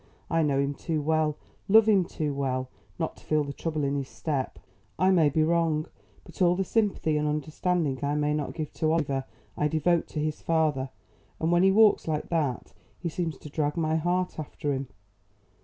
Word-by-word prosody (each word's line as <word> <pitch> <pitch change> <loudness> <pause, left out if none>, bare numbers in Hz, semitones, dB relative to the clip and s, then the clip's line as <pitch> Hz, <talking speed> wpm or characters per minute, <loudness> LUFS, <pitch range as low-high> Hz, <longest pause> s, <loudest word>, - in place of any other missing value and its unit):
I 165 - +3
know 145 -3 +2
him 140 +1 0
too 160 +2 -2
well, 155 0 +1 0.3
love 220 +2 +7
him 200 -4 +4
too 150 -4 -3
well, 130 -2 -2 0.3
not - - -3
to - - -17
feel 155 -1 +1
the 140 -1 -5
trouble 155 -1 -3
in 140 0 0
his 140 -2 -3
step. 140 -5 -3 0.4
I 185 +1 +4
may 165 -5 +5
be 155 +2 +2
wrong, 160 -1 +1 0.4
but - - -12
all 175 -1 +5
the 195 - 0
sympathy 195 -7 +1
and 150 0 0
understanding 150 0 -1
I 145 +1 0
may 150 0 +1
not 150 -2 -3
give 155 -3 -4
to 155 -1 0
Oliver 140 -5 0 0.3
I 150 - +1
devote 160 +2 +1
to 155 - -5
his 155 0 -2
father, 155 -5 +1 0.5
and 160 +1 +1
when 175 0 +4
he 190 +1 +5
walks 215 -2 +5
like 155 -2 -2
that 150 -7 -1 0.2
he 170 - -3
seems 165 -3 -3
to 150 - -10
drag 150 0 -1
my 160 -1 +1
heart 175 +2 0
after 145 -1 -3
him. 135 0 -3
155 Hz, 200 wpm, -27 LUFS, 145-170 Hz, 0.5 s, love